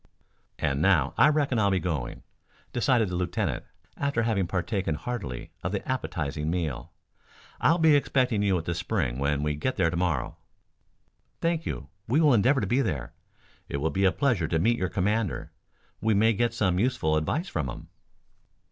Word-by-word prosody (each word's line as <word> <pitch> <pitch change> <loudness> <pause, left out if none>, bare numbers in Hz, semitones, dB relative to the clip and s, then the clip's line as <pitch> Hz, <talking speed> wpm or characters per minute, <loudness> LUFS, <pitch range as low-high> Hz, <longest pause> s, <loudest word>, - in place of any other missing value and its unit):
"And 70 0 0
now 80 -6 +3
I - - +6
reckon 145 -5 +1
I'll 100 -1 +3
be 95 - +2
going," 80 -9 -3 0.5
decided 120 -3 +2
the 90 - -3
lieutenant, 90 -1 -2 0.3
after 140 -5 0
having 105 -5 +1
partaken 95 -2 -1
heartily 80 - -5
of 85 - -2
the 100 - -3
appetizing 80 - -2
meal. 80 -6 -3 0.7
"I'll 165 - +4
be 160 -3 +5
expecting 125 -6 +2
you 100 -3 +2
at 85 - -5
the 85 - -1
Spring 85 - -1
when 70 +1 0
we 75 0 0
get 75 - -2
there 85 - +2
to - - -3
morrow." 85 -7 -1 1.0
"Thank 165 -1 0
you; 70 -3 -5 0.2
we 130 +7 +3
will 150 -4 +5
endeavor 130 +5 +3
to - - 0
be 130 +3 +2
there. 70 - -3 0.6
It - - -2
will 80 +3 -1
be 95 0 +1
a 95 - +5
pleasure 120 - +1
to 80 - 0
meet 115 +8 +2
your 95 - 0
commander. 105 +3 -1 0.5
We 110 +1 +2
may 110 +3 +4
get 115 +2 0
some 95 -5 +1
useful 100 -10 +1
advice 145 - -1
from 75 - -2
him." - - -9
95 Hz, 180 wpm, -27 LUFS, 80-120 Hz, 1.0 s, I